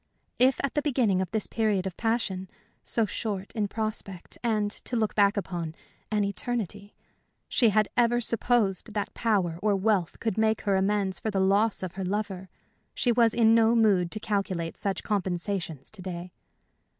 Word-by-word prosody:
If 255 +1 +4
at 275 - -1
the 295 - +1
beginning 245 -10 +2
of 185 - -2
this 220 0 -1
period 210 -4 0
of 190 -3 -4
passion 205 -5 -1 0.3
so 230 - +1
short 205 -1 -4
in 210 -2 0
prospect, 215 -4 -5
and, 215 -3 +1
to 245 - -5
look 220 -2 +1
back 200 0 +3
upon, 170 -5 -3 0.3
an 210 -1 +1
eternity 205 -1 -3 0.5
she 235 -4 +4
had 215 0 +3
ever 240 0 +3
supposed 225 -3 +1
that 205 - -2
power 190 -7 0
or 205 0 +2
wealth 195 -3 0
could 220 -2 -1
make 220 0 +2
her 200 -2 +1
amends 195 -1 +1
for 220 - -2
the 200 -2 0
loss 200 +2 +2
of 185 - -3
her 190 +1 -5
lover, 190 -1 -3 0.5
she 245 - +2
was 230 -1 +3
in 225 -1 +5
no 230 0 +5
mood 200 -6 +3
to 215 - 0
calculate 195 -6 -2
such 195 -1 -2
compensations 180 -5 -2
to 210 - -11
day. 180 -1 -6
205 Hz, 175 wpm, -27 LUFS, 190-225 Hz, 0.5 s, in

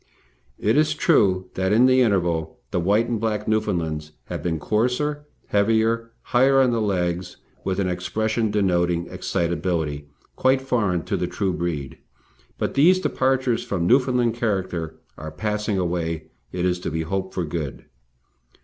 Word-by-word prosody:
It 110 +6 +1
is 155 0 +3
true 95 - +2
that 95 +1 0
in 115 +4 +5
the 130 0 +5
interval 85 -8 +1
the - - 0
white 105 +6 +2
and 115 -2 -1
black 105 -1 -2
Newfoundlands 85 -9 -1 0.2
have - - -4
been 85 -2 -1
coarser, 125 - -1 0.2
heavier, 115 +2 +2
higher 135 +2 +4
on 130 -2 +4
the 115 -1 0
legs, 90 -3 -1 0.3
with 95 0 -1
an 95 - +1
expression 110 +5 -1
denoting 90 -4 +1
excitability 85 -4 -2 0.3
quite 130 +1 +3
foreign 105 -10 0
to - - -2
the - - -1
true 95 -2 -1
breed, 80 -6 -4 0.6
but - - -2
these 180 +7 +5
departures 130 -7 +1
from 90 -4 -2
Newfoundland 125 0 +3
character 95 -8 -2 0.2
are 80 - -6
passing 105 +6 -2
away 85 -3 -2 0.2
it 90 0 -2
is 90 -1 +1
to - - -3
be 80 0 -2
hoped 95 +3 -3
for 90 - -1
good. 75 -3 -5
100 Hz, 150 wpm, -23 LUFS, 85-115 Hz, 0.6 s, in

